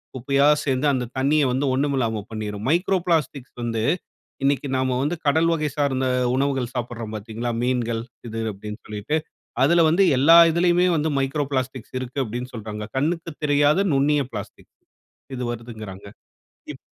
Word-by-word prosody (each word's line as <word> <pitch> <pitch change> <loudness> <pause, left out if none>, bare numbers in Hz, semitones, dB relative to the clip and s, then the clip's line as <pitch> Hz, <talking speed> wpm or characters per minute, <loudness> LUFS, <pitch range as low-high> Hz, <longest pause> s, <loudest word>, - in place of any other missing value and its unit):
குப்பையா 140 +3 +2 0.2
சேர்ந்து 135 +1 +1
அந்த 125 -2 -1
தண்ணிய 145 +3 +3
வந்து 130 +3 0
ஒண்ணுமில்லாம 130 -5 0
பண்ணிரும். 105 0 -5
மைக்ரோ 180 +4 +2
பிளாஸ்டிக்ஸ் 150 -6 -1
வந்து 115 -2 -1 0.6
இன்னைக்கு 140 0 +1
நாம 130 -1 0
வந்து 150 +5 -1
கடல் 160 +3 +3
வகை 155 -2 0
சார்ந்த 135 -3 0 0.3
உணவுகள் 135 -3 0
சாப்பிடுறோம் 120 -3 -5
பார்த்தீங்களா, 110 +3 -4
மீன்கள் 120 -2 0 0.3
இது 115 +1 -4
அப்படினு 105 +2 -8
சொல்லிட்டு 105 +8 -2 0.5
அதுல 170 +5 +5
வந்து 170 +5 +3
எல்லா 150 +6 +7
இதுலயுமே 175 +2 +3
வந்து 155 +1 0
மைக்ரோ 135 +2 0
பிளாஸ்டிக்ஸ் 130 -3 -3
இருக்கு 130 +2 -6
அப்படினு 120 +2 -5
சொல்றாங்க. 105 -1 -6
கண்ணுக்கு 165 +4 -1
தெரியாத 145 +6 +3
நுண்ணிய 145 +1 +3
பிளாஸ்டிக் 105 -1 -8 0.7
இது 125 - -3
வருதுங்கறாங்க. 110 -5 -8 0.7
இப் - - -12
130 Hz, 140 wpm, -23 LUFS, 115-145 Hz, 0.7 s, எல்லா